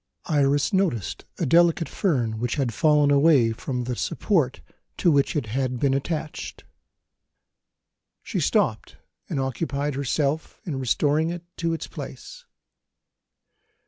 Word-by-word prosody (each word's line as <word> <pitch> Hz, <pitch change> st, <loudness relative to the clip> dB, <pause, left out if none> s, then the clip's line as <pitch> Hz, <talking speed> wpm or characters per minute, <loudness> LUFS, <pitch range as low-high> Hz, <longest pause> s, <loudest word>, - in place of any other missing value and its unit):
Iris 145 Hz, -1 st, +2 dB
noticed 165 Hz, -, 0 dB
a 170 Hz, -, -1 dB
delicate 165 Hz, +2 st, +4 dB
fern 120 Hz, -, 0 dB
which 120 Hz, 0 st, -1 dB
had 130 Hz, -6 st, -1 dB
fallen 150 Hz, +3 st, +4 dB
away 140 Hz, -5 st, +5 dB
from 125 Hz, +2 st, -4 dB
the 125 Hz, 0 st, -3 dB
support 150 Hz, -, 0 dB, 0.4 s
to 175 Hz, -, +3 dB
which 140 Hz, +1 st, +2 dB
it 145 Hz, -, 0 dB
had 130 Hz, +3 st, -2 dB
been 135 Hz, 0 st, +2 dB
attached. 150 Hz, +2 st, -4 dB, 1.6 s
She -, -, -3 dB
stopped, -, -, 0 dB, 0.3 s
and -, -, -2 dB
occupied 140 Hz, +2 st, -2 dB
herself 140 Hz, +3 st, -1 dB
in 145 Hz, -6 st, -4 dB
restoring 145 Hz, +5 st, +1 dB
it 175 Hz, 0 st, -5 dB
to 165 Hz, -1 st, 0 dB
its 165 Hz, -, -4 dB
place. -, -, -9 dB
145 Hz, 125 wpm, -24 LUFS, 130-160 Hz, 1.6 s, away